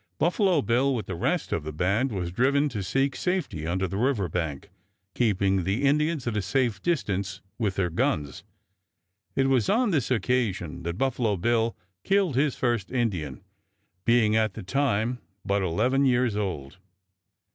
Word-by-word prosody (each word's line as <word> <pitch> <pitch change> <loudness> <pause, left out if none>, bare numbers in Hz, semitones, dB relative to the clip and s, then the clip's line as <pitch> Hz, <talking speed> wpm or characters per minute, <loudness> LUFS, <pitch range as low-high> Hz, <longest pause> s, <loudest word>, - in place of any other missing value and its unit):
Buffalo 180 - +2
Bill, 130 +4 +2
with 115 - -3
the 95 - -5
rest 85 - -1
of 80 - -1
the 80 - -5
band, 100 - 0
was 90 -4 -3
driven 140 +8 +2
to 105 -6 -4
seek 135 +8 0
safety 180 - -2
under 95 +2 0
the 95 +3 -4
river 120 -6 +1
bank, 80 -4 -4 0.4
keeping 95 -5 +1
the 100 +9 -1
Indians 150 +1 +2
at 120 -2 -2
a 105 - +1
safe 115 -1 0
distance 100 - -1 0.2
with 105 -5 0
their 90 -3 0
guns. 75 -3 -1 0.9
It 135 0 +2
was 130 -5 +2
on 230 0 +3
this 145 -8 0
occasion 110 -8 0
that 85 +1 -4
Buffalo 120 -5 0
Bill 115 +4 +1 0.3
killed 195 -7 +2
his 140 0 +2
first 120 -6 -1
Indian, 95 - -2 0.6
being 115 -1 +3
at 110 -3 +1
that 110 - -7
time 125 -1 0 0.3
but 100 +1 +1
eleven 125 +10 +2
years 120 -3 +2
old. 90 -7 -4
115 Hz, 160 wpm, -26 LUFS, 95-135 Hz, 0.9 s, on